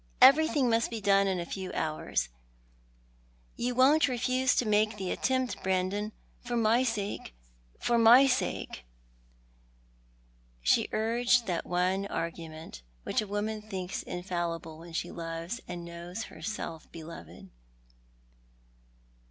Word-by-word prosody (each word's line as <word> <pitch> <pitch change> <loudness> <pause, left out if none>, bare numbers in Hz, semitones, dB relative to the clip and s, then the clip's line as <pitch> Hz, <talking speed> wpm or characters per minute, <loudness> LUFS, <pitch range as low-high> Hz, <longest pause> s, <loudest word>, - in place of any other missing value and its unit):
Everything 295 -1 +6
must 230 -1 +2
be 230 - -4
done 200 -1 +4
in 190 -2 0
a 170 - -3
few 185 +1 -5
hours. 155 - -1 1.3
You 245 +1 -2
won't 280 +5 +5
refuse 255 +1 +1
to 245 - +2
make 215 0 +2
the 190 -2 -3
attempt, 260 -1 0
Brandon, 190 +3 0 0.3
for 240 0 -3
my 230 +2 +4
sake, 210 - -3 0.4
for 235 -1 +2
my 235 +4 +8
sake." 255 - -1 1.8
She - - +3
urged 235 +2 +2
that 175 -4 -2
one 185 +3 +1
argument 160 - -5 0.2
Mhich - - +1
a 215 - -5
woman 210 +2 -2
thinks 190 -3 -4
infallible 170 -3 -4
when 170 0 -11
she 170 +1 -2
loves 165 +6 -5
and 175 -1 -6
knows 170 +5 -6
herself 170 -9 -6
beloved. 95 - -10
200 Hz, 120 wpm, -30 LUFS, 170-235 Hz, 1.8 s, my